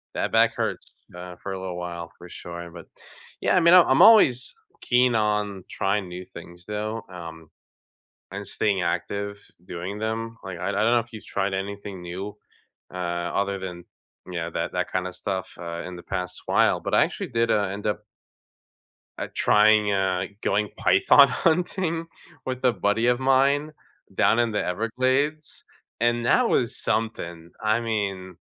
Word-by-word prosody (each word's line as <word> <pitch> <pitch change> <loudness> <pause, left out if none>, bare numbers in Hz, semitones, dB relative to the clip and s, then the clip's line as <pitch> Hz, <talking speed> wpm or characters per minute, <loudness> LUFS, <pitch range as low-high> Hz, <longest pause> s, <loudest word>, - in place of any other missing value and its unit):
that - - -1
back - - +4
hurts, - - -3 0.2
uh, 90 0 -8
for 100 - -6
a 95 - -5
little 95 -2 -5
while 85 -1 -6
for 90 0 -12
sure. 85 0 -8
But, 85 0 -11 0.6
yeah, - - +2
I - - +7
mean, 170 +1 +6
I'm 160 -7 +6
always 135 - +6 0.3
keen 125 -1 +3
on 105 -3 0
trying 100 -1 -1
new 90 +1 -7
things 85 +1 -12
though, 105 +1 -3
um, 80 -3 -9 0.8
and 100 +1 -6
staying 100 -2 0
active 100 +4 -2 0.3
doing 90 +4 -6
them. 115 +1 -3
Like, 95 -2 -6
I 100 - -1
d - - -3
I 105 - +2
don't 115 +2 +4
know 120 - +5
if 120 - -24
you've 110 - -9
tried 100 0 -2
anything 100 -1 -5
new, 95 +4 -6 0.6
uh, - - -6 0.4
other 100 -1 -2
than, 90 -2 -7 0.4
you 90 -2 -4
know, 85 0 -4
that 85 +1 -2
that 90 0 -1
kind 95 0 -1
of 90 - -8
stuff, 95 -3 -3
uh, 85 -1 -5
in 90 - -7
the 90 - -11
past 90 0 -3
while, - - +3
but - - -4
I - - +6
actually - - -4
did, 115 0 +2
uh, 105 -2 +2
end 100 - -9
up 105 0 -1 1.2
uh, - - -4
trying, 105 0 +4
uh, 95 -2 +1 0.2
going 105 +1 0
python 140 -1 +6
hunting 165 +2 0 0.4
with 130 -1 -3
a 125 - +5
buddy 115 +2 +1
of 125 0 +3
mine 140 +3 +3 0.4
down 120 - +3
in 120 -1 +2
the 105 - -1
Everglades, 130 +10 -1 0.4
and 120 0 +1
that - - +4
was - - +1
something. 85 -7 -2
I 110 +2 +2
mean, 100 -5 -3
100 Hz, 175 wpm, -25 LUFS, 90-115 Hz, 1.2 s, I